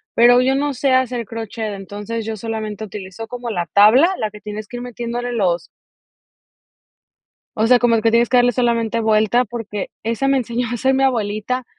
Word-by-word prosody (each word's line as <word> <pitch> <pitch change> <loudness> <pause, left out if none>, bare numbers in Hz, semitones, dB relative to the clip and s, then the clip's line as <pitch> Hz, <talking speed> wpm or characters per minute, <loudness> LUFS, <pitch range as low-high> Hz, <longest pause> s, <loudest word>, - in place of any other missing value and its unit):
pero 245 +1 +6
yo 265 +1 +2
no 285 +1 0
sé 265 +2 0
hacer 250 -2 +1
crochet, 225 0 -5
entonces 205 +3 -6
yo 225 0 -3
solamente 220 -1 -5
utilizo 200 +2 -8
como 245 0 -6
la 175 -5 -2
tabla, 215 - +6
la 215 -2 -2
que 210 - -13
tienes 210 0 -7
que 245 - -8
ir 245 - -6
metiéndole 240 0 -4
los 180 -7 -1 1.9
o 220 +1 +1
sea, 250 +1 +6
como 240 -1 +3
el 220 - +1
que 225 - +3
tienes 235 +1 +3
que 250 - +3
darle 245 0 +4
solamente 230 -2 0
vuelta, 220 +2 +2
porque 210 -3 -5
esa 230 +4 -1
me 275 0 +3
enseñó 240 0 -2
a - - -3
hacer 265 +3 +1
mi 270 - +1
abuelita, 240 0 -1
230 Hz, 195 wpm, -19 LUFS, 215-245 Hz, 1.9 s, pero